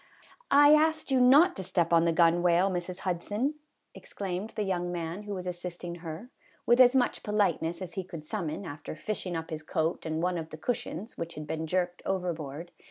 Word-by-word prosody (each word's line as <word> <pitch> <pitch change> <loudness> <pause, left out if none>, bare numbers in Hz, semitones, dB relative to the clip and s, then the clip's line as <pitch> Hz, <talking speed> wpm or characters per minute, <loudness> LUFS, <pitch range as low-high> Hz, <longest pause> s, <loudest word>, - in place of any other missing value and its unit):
" - - -29
I 290 +1 +7
asked 315 -1 +2
you 260 -1 +4
not 290 +9 +6
to 190 - -4
step 170 -2 0
on 165 0 +5
the 170 - +3
gunwale, 175 +3 +4
Mrs. 180 0 -4
Hudson," 205 - -1 0.4
exclaimed 195 +2 -5
the 210 - -1
young 175 -2 -1
man 170 +2 -4
who 205 -1 -4
was 185 -1 -6
assist 180 0 -5
ing 175 -1 -4
her, 170 +9 -7 0.3
with 240 +1 +4
as 250 0 +7
much 250 -2 +2
politeness 195 -4 0
as 180 - -8
he 190 - -3
could 165 -4 -9
sum 185 0 -3
mon 170 +6 -5
after 150 -1 -7
fishing 180 +1 -3
up 160 0 -5
his 155 -1 -4
coat 160 +2 -2
and 160 +1 -2
one 180 -1 0
of 160 0 -7
the 155 - -8
cush 235 +10 -2
ions, 205 +8 -8
which 170 0 -5
had 150 - -6
been 160 +1 -3
jerked 180 +1 -1
overboard. 170 -4 -3
180 Hz, 215 wpm, -29 LUFS, 165-210 Hz, 0.4 s, I